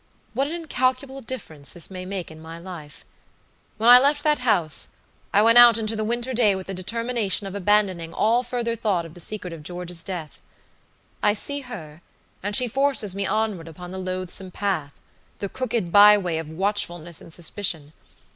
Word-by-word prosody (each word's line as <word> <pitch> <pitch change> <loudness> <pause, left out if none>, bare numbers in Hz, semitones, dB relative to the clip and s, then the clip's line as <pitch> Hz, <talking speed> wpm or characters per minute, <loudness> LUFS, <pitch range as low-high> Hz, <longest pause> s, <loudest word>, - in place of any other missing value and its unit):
What 275 +1 0
an 310 - -5
incalculable 270 -4 -1
difference 180 - -6
this 175 +1 -7
may 185 -1 -7
make 190 -4 -5
in 160 0 -12
my 165 +1 -9
life. 170 -4 -10 0.7
When 220 +2 0
I 245 +1 +11
left 290 +2 +2
that 300 -2 +2
house, 200 -11 +2 0.4
I 205 - +4
went 230 +2 +7
out 240 -2 +9
into 225 0 -1
the 215 - -2
winter 240 +3 -2
day 220 -5 +3
with 190 -1 -6
the 195 - -5
determination 220 +2 -1
of 195 - -6
abandoning 195 -4 +1
all 230 +6 +2
further 240 -2 -2
thought 205 -7 -1
of 165 - -11
the 175 - -7
secret 185 -1 -3
of 165 - -9
George's 175 +1 -3
death. 175 -6 -7 0.8
I 210 - +3
see 285 +6 -2
her, 170 - -9 0.4
and 205 +1 -1
she 250 - +4
forces 265 -5 +1
me 200 0 -2
onward 215 -6 -1
upon 175 +2 -10
the 190 - -6
loathsome 185 0 -3
paththe 180 -7 -2 0.6
crooked 230 -8 -2
by 210 +2 +8
way 175 -5 -2
of 160 -1 -7
watchfulness 175 -2 -2
and - - -13
suspicion. 160 -3 -1
200 Hz, 180 wpm, -23 LUFS, 175-235 Hz, 0.8 s, I